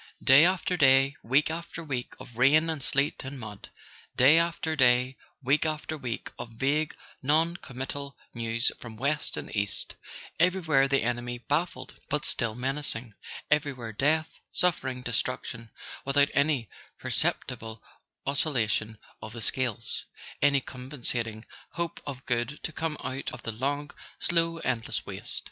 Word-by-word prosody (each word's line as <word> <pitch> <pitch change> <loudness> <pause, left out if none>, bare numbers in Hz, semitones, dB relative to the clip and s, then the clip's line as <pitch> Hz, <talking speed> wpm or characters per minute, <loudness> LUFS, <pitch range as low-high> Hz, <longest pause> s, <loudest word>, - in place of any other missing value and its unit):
Day 135 +4 +8
after 185 0 +1
day, 135 -1 +5
week 140 +6 +3
after 165 0 -5
week, 135 -5 -3
of 120 - -11
rain 150 +7 +5
and 155 -3 -4
sleet 140 +2 0
and 135 0 -6
mud; 105 -4 -8 0.5
day 145 +6 +7
after 165 -1 0
day, 125 -1 +4 0.3
week 135 +4 +3
after 155 0 -2
week, 125 -6 -4
of 115 - -6
vague 145 +5 +1 0.3
non 160 +5 +3
committal 140 +1 -6 0.2
news 115 0 +1
from 115 -2 -9
west 145 +5 0
and - - -6
east; 100 -1 -1 0.5
everywhere 165 -6 +4
the 135 -3 +2
enemy 120 +1 -1
baffled 145 +1 -2 0.2
but 150 +1 0
still 115 -3 +1
menacing, 130 -3 -2 0.4
everywhere 135 -7 +1
death, 155 +7 +1
suffering, 130 -8 0
destruc¬ 125 +1 -1
tion, 115 -2 -7 0.3
without 140 +1 +4
any 140 -5 +2 0.3
perceptible 110 -1 -1 0.4
oscillation 120 -6 +1 0.2
of 110 - -7
the 120 - -6
scales, 115 -3 0 0.4
any 140 -1 +5
compensating 120 -4 -4 0.3
hope 170 -1 -3
of 135 -2 -6
good 125 +4 0
to - - -2
come 160 -1 -2
out 135 +2 -3
of 155 - -9
the 115 - -2
long 140 +6 -2 0.3
slow 165 -1 +1
endless 120 -3 -1
waste. - - -2
135 Hz, 140 wpm, -28 LUFS, 120-150 Hz, 0.5 s, Day